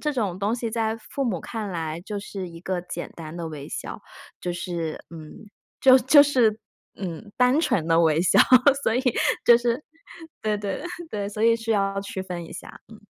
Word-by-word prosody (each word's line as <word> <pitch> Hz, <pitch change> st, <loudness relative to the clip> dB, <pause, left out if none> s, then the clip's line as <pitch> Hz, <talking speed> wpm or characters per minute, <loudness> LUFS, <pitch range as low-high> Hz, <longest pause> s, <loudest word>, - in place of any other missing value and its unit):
这 300 Hz, -, 0 dB
种 200 Hz, -8 st, -1 dB
东 205 Hz, +3 st, 0 dB
西 235 Hz, -2 st, -3 dB
在 225 Hz, -1 st, -1 dB
父 270 Hz, +5 st, -5 dB
母 200 Hz, -7 st, -1 dB
看 220 Hz, -3 st, -5 dB
来 165 Hz, -2 st, -4 dB
就 205 Hz, +3 st, -5 dB
是 195 Hz, -2 st, -6 dB
一 165 Hz, -1 st, -11 dB
个 180 Hz, 0 st, -2 dB
简 175 Hz, -1 st, -7 dB
单 160 Hz, 0 st, -8 dB
的 170 Hz, -1 st, -4 dB
微 150 Hz, -2 st, -8 dB
笑， -, -, -6 dB, 0.4 s
就 180 Hz, -, -3 dB
是， 170 Hz, -2 st, -4 dB
嗯， 160 Hz, +3 st, -11 dB, 0.3 s
就 260 Hz, 0 st, +7 dB
就 270 Hz, +4 st, +7 dB
是， 245 Hz, -7 st, +2 dB, 0.4 s
嗯， 190 Hz, +2 st, -7 dB
单 250 Hz, +4 st, +4 dB
纯 170 Hz, -, 0 dB
的 165 Hz, 0 st, +4 dB
微 160 Hz, -2 st, +3 dB
笑， 180 Hz, -, +3 dB, 0.4 s
所 225 Hz, -, +1 dB
以 250 Hz, -, +1 dB, 0.4 s
就 235 Hz, 0 st, +7 dB
是， 240 Hz, +3 st, -1 dB, 0.6 s
对 215 Hz, -1 st, 0 dB
对 200 Hz, +2 st, -4 dB, 0.3 s
对， 200 Hz, -1 st, -3 dB
所 210 Hz, +1 st, -4 dB
以 230 Hz, 0 st, +6 dB
是 225 Hz, 0 st, -4 dB
要 195 Hz, -2 st, +1 dB
区 195 Hz, -1 st, -5 dB
分 175 Hz, -3 st, -6 dB
一 -, -, -14 dB
下， -, -, -10 dB
嗯。 220 Hz, -, -12 dB
200 Hz, 210 characters per minute, -24 LUFS, 175-230 Hz, 0.6 s, 就